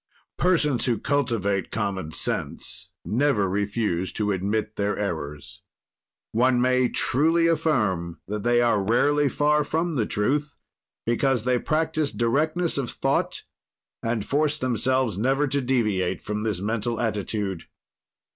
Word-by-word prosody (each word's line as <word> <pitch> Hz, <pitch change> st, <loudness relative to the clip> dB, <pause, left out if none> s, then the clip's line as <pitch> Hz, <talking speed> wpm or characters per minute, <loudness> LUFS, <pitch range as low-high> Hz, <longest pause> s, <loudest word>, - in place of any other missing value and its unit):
Persons 155 Hz, -8 st, +2 dB
who 120 Hz, -3 st, +1 dB
cultivate 115 Hz, -8 st, 0 dB
common 100 Hz, -7 st, -3 dB
sense 90 Hz, +3 st, -4 dB, 0.2 s
never 120 Hz, -4 st, +2 dB
refuse 100 Hz, -2 st, -1 dB
to 105 Hz, -1 st, 0 dB
admit 105 Hz, +3 st, -1 dB
their 100 Hz, 0 st, -1 dB
errors. 80 Hz, -7 st, -5 dB, 0.7 s
One 125 Hz, +2 st, +3 dB
may 125 Hz, 0 st, +3 dB
truly 165 Hz, +6 st, +2 dB
affirm 110 Hz, -, +1 dB
that 105 Hz, +1 st, -3 dB
they 120 Hz, +2 st, +3 dB
are 110 Hz, -4 st, +2 dB
rarely 145 Hz, +7 st, +3 dB
far 150 Hz, +1 st, +2 dB
from 165 Hz, +3 st, -1 dB
the 115 Hz, -7 st, 0 dB
truth, 145 Hz, +8 st, -1 dB, 0.5 s
because 120 Hz, 0 st, +1 dB
they 125 Hz, 0 st, +2 dB
practise 155 Hz, 0 st, 0 dB
directness 155 Hz, +8 st, 0 dB
of 130 Hz, -, -2 dB
thought -, -, -1 dB, 0.6 s
and 115 Hz, -2 st, -1 dB
force 150 Hz, +1 st, +1 dB
themselves 130 Hz, -4 st, 0 dB
never 135 Hz, +5 st, +2 dB
to 140 Hz, +1 st, 0 dB
deviate 110 Hz, -8 st, 0 dB
from 105 Hz, 0 st, -4 dB
this 105 Hz, -4 st, -1 dB
mental 115 Hz, +2 st, -1 dB
attitude. 105 Hz, -5 st, -2 dB
120 Hz, 130 wpm, -25 LUFS, 105-140 Hz, 0.7 s, One